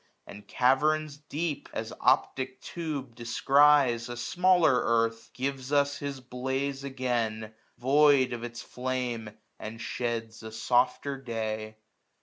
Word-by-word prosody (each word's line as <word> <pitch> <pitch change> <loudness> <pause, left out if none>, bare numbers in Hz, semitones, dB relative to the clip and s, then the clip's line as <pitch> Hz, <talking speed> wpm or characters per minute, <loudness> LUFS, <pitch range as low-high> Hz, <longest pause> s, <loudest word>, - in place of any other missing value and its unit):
And 105 0 -12
caverns 145 +3 +2
deep, 150 +1 -4
as - - -4
optic 130 0 +1
tube 145 -8 -5
descries, 130 +1 +4
1091 - - -4
A - - -8
smaller 175 +3 +3
earth, 115 0 0
gives 135 0 -4
us 140 0 +2
his 140 -1 -4
blaze 130 +2 -3
again. 120 -5 -2 0.2
Void 135 -1 +4
of 120 -1 -5
its 120 0 -6
flame, 125 -3 -3 0.3
and 110 +1 -7
sheds 115 -2 -3
a 110 0 -8
softer 125 +4 +1
day. 110 -3 -4
130 Hz, 125 wpm, -28 LUFS, 115-140 Hz, 0.3 s, descries